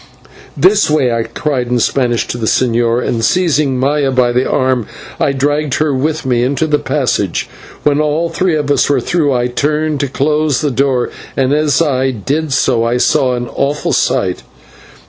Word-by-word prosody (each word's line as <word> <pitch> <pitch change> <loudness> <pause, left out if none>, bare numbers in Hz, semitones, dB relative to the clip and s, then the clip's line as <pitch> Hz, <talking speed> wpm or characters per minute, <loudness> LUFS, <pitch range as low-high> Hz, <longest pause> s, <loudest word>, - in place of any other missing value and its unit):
"This 195 +2 +3
way!" 145 -5 +2
I 115 - 0
cried 125 +3 -3
in 125 +1 0
Spanish 120 0 0
to 120 - -4
the 110 - -2
señor, 120 0 +1
and 115 -2 -1
seizing 150 -4 +1
Maya 140 +1 +1
by 125 -2 +2
the 125 +2 0
arm 130 -4 0 0.3
I - - +2
dragged 145 +1 0
her 155 -2 0
with 150 +3 -2
me 125 -2 +1
into 140 +5 0
the 150 -1 +1
passage. - - -1 0.4
When 145 0 +2
all 155 +3 0
three 180 0 0
of 145 -2 -1
us 145 - +2
were 145 - +2
through 160 -5 0
I 125 -2 0
turned 150 +4 -1
to 140 - 0
close 150 +1 0
the 150 -2 0
door, 130 -1 0 0.3
and 135 +1 +2
as 150 0 +2
I 135 -3 0
did 140 +7 -2
so 125 -3 +1
I 120 +1 0
saw 125 +1 +2
an 120 0 -4
awful 145 +2 -1
sight. - - 0
135 Hz, 185 wpm, -14 LUFS, 125-150 Hz, 0.4 s, This